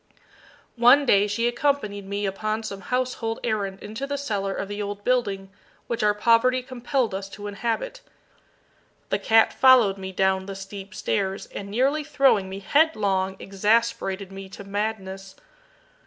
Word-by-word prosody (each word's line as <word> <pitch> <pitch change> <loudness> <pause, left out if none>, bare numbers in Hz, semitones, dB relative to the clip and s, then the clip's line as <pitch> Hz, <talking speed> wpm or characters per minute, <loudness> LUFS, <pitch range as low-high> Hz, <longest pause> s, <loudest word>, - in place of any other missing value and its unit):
One 250 +5 +6
day 205 -4 +4
she 230 +3 0
accompanied 240 -6 -1
me 200 +1 -2
upon 215 +3 -2
some 200 -3 -6
household 250 -1 -2
errand 200 -4 -2
into 220 +6 -5
the 285 0 -2
cellar 205 -8 -2
of 195 - -4
the 205 +1 -5
old 205 0 -5
building 200 -6 0 0.3
which 235 - -3
our 210 -1 +3
poverty 235 +4 +3
compelled 255 -2 -1
us 195 0 -4
to 205 +1 -9
inhabit. 235 - -3 1.1
The - - 0
cat 225 0 +4
followed 240 -7 +5
me 190 0 -6
down 190 0 +1
the 195 - -6
steep 195 +1 -9
stairs, 195 -1 -2
and 200 0 -6
nearly 270 +8 +1
throwing 275 -10 +2
me 195 +1 -7
headlong, 200 -9 +2
exasperated 200 -1 0
me 195 0 -9
to 200 - -10
madness. 195 -2 -4
210 Hz, 150 wpm, -24 LUFS, 195-240 Hz, 1.1 s, One